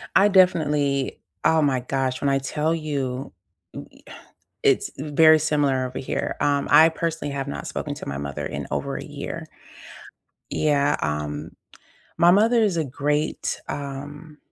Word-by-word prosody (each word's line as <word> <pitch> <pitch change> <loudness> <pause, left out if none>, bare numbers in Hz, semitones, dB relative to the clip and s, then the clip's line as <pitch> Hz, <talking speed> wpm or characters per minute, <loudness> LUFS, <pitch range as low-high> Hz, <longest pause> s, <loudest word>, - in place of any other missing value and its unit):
I 195 - +6
definitely 150 -7 +2 0.3
oh 160 0 +3
my 135 -4 +2
gosh, 130 0 -2
when 140 - +1
I 135 0 +2
tell 150 +4 -1
you, 140 -5 -3 0.4
ooh - - -8
e - - -21
uh - - -11 0.5
it's - - +3
very 155 +2 +5
similar 140 -4 +1
over 125 0 -5
here. 130 - -3
Um, 145 -1 +1
I 160 +1 +8
personally 165 -2 -3
have 135 0 -3
not 140 - -5
spoken 145 - -4
to - - -9
my 70 - -4
mother 70 -1 -5
in - - -4
over - - -2
a - - -6
year. - - -7 1.1
Yeah. 145 -1 +2
Um, 75 +1 -3 0.7
my 170 +1 +6
mother 225 +4 +4
is 200 -6 +1
a 160 - +1
great, 145 +3 -2
um, 145 +2 -7
145 Hz, 155 wpm, -23 LUFS, 135-160 Hz, 1.1 s, I